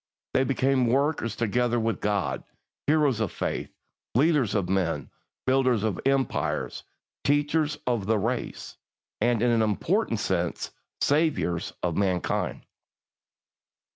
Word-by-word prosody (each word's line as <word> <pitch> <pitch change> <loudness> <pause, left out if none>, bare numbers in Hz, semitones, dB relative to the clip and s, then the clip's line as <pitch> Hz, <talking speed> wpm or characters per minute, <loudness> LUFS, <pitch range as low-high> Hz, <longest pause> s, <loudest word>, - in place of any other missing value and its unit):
They 130 - +4
became 130 -1 +2
"workers 135 -3 +1
together 120 +2 +1
with 115 0 -1
God," 100 -3 0 0.4
heroes 145 -6 +3
of 110 -5 0
faith, - - -3 0.5
leaders 135 - +3
of 100 -4 +1
men, 85 -7 -1 0.3
builders 130 -4 +3
of 110 -5 -1
empire, 135 -1 0 0.5
teachers 145 +1 +2
of 120 -6 0
the 110 0 +3
race, 100 - -3 0.4
and, 120 -2 +2
in 120 - +4
an 115 -1 +3
important 115 - +1
sense, 90 -4 -1 0.3
saviours 140 - +1
of 85 -2 0
mankind. 95 -3 0
120 Hz, 115 wpm, -27 LUFS, 100-135 Hz, 0.5 s, They